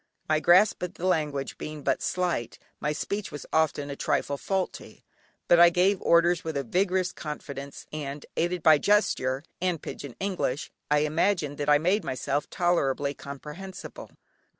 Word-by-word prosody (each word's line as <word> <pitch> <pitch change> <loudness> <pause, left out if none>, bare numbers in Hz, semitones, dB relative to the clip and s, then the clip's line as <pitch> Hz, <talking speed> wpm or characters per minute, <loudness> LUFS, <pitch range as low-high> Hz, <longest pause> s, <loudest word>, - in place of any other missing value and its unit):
My 155 0 +3
grasp 180 +6 +5
of 180 0 -4
the 180 - -5
language 150 -6 -1
being 155 -1 -6
but - - +1
slight, 175 -10 -1 0.2
my 150 - -1
speech 200 +6 -3
was 145 - -7
often 150 -2 +1
a - - -4
trifle 140 - 0
faulty, 190 +6 -4 0.4
but 175 - +6
I 175 0 +9
gave 185 +3 +2
orders 170 0 +4
with 160 -3 -3
a 140 - -1
vigorous 185 - +1
confidence, 140 -3 -7
and 145 -1 -5
aided 175 0 -1
by 155 -2 +7
gesture 140 -10 +2 0.2
and 180 -3 0
"pigeon 140 -3 -8
English" 180 -8 -2 0.2
I 150 0 +4
imagined 155 -2 0
that 145 0 -1
I 145 - +7
made 185 +8 +1
myself 140 +2 -2
tolerably 145 -6 +1
comprehensible. 150 +8 -9
155 Hz, 155 wpm, -27 LUFS, 145-180 Hz, 0.4 s, I